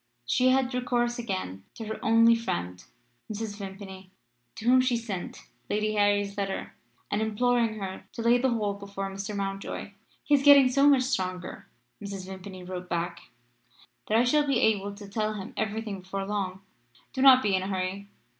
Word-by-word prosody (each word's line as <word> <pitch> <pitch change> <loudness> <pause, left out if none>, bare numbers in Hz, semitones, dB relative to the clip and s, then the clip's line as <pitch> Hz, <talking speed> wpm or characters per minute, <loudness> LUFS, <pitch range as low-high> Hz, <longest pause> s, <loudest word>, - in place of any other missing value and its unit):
She 250 - +3
had 260 0 +2
recourse 240 -1 0
again 185 - -4
to 225 - -7
her 220 +1 -5
only 230 +1 +6
friend 90 - -3 0.5
Mrs. 215 -1 -5
Vimpany 190 -1 -9 0.5
to 220 - -8
whom 255 +1 +6
she 255 -2 +1
sent 210 -6 -6 0.3
Lady 215 +1 0
Harry's 205 -1 +2
letter, 195 -1 -3 0.4
and 205 - 0
imploring 230 +1 +1
her 190 -2 -6
to 230 - -5
lay 240 +1 +4
the 260 +1 +2
whole 215 -4 0
before 200 -1 -6
Mr. 200 +2 -5
Mountjoy. 195 0 -4 0.3
"He 295 - 0
is 280 - +5
getting 280 -2 +8
so 275 +3 +5
much 270 -3 +5
stronger," 185 -9 -3 0.4
Mrs. 200 -2 -6
Vimpany 190 -1 -9
wrote 180 0 -7
back, 170 0 -3 0.8
"that 215 - +3
I 235 - +5
shall 290 +4 +3
be 275 - +2
able 205 -2 +1
to 205 0 -10
tell 215 +1 -2
him 195 -2 -7
every 220 +1 -2
thing 200 -4 -6
before 195 +1 -4
long. 195 -2 -3 0.5
Do 260 - -2
not 260 -1 +8
be 205 -2 +1
in 185 - +1
a 190 - -4
hurry. 190 +1 -3
205 Hz, 180 wpm, -27 LUFS, 195-240 Hz, 0.8 s, getting